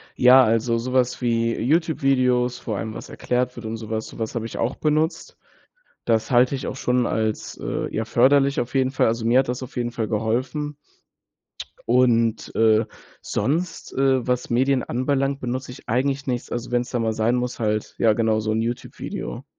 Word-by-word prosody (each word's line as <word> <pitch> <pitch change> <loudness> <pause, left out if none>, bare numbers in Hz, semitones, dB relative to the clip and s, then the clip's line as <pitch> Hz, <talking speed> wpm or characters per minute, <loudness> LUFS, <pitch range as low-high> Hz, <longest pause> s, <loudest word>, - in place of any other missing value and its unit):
Ja, 130 +1 +7
also 115 +1 +1
sowas 125 +1 0
wie 115 -1 +1
Youtube-Videos, 130 -4 +1
vor 110 -3 -4
allem 110 +3 -4
was - - -9
erklärt 125 0 -1
wird 120 - -9
und 110 +1 -4
sowas 110 0 -4
sowas 115 +1 -5
habe 115 - -2
ich 115 - -7
auch 115 - 0
benutzt. 155 +2 -1 0.7
Das 115 +1 +1
halte 125 +3 +4
ich 130 - -5
auch - - -4
schon 125 -2 +1
als, 110 -1 -2
äh, - - -3
ja, 110 0 -1
förderlich 140 +4 +3
auf 120 +2 -3
jeden 130 -1 +2
Fall. 130 - +2
Also, 115 0 -1
mir 120 +2 +4
hat 130 -2 0
das 125 +1 -3
auf 130 - -9
jeden 120 -1 -1
Fall 115 -2 -3
geholfen. 125 +7 -2 1.1
Und, 115 -2 +2
äh, 110 0 +4 0.4
sonst, 165 - -2
äh, 135 -2 +2
was 125 -1 -1
Medien 130 +2 +2
anbelangt, 135 +2 -1
benutze 125 +1 -4
ich 130 - -14
eigentlich 135 +4 0
nichts. 125 -2 -2
Also 120 +1 -4
wenn's 120 0 0
da 120 - -1
mal 110 -1 0
sein 110 +3 +1
muss 125 0 -3
halt 105 -1 -1
ja 110 -2 +4
genau 110 0 +1
so 110 0 -2
'n 110 +1 0
Youtube-Video. 120 +1 -5
125 Hz, 185 wpm, -23 LUFS, 115-130 Hz, 1.1 s, Ja